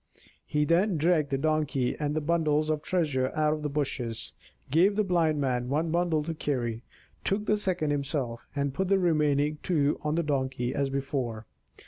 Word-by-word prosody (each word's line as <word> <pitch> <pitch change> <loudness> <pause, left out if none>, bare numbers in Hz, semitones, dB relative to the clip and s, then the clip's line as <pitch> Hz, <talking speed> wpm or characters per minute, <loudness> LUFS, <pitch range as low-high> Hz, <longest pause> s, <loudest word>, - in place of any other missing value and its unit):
He 150 0 +1
then 175 +4 +2
dragged 155 -2 +2
the 135 - 0
Donkey 150 -3 0
and 150 -1 -2
the 155 - 0
bundles 155 -1 +1
of 155 -1 -1
treasure 145 -8 0
out 155 0 +2
of 155 - -4
the 150 - -2
bushes, 135 -5 -2 0.4
gave 180 +7 +4
the 215 - +2
Blind 165 -5 +2
Man 125 -3 0
one 155 +4 0
bundle 170 -2 +1
to 165 +2 -3
carry, 120 -7 -2 0.4
took 205 +2 0
the 210 - +3
second 185 -7 0
himself, 140 -5 -2
and 140 -1 -1
put 190 +6 -1
the 195 +1 +4
remaining 150 -4 +2
two 150 -5 +1
on 150 0 0
the 170 - +1
Donkey, 130 -4 -1
as 140 -1 0
before. 135 -5 -3
150 Hz, 180 wpm, -28 LUFS, 140-165 Hz, 0.4 s, gave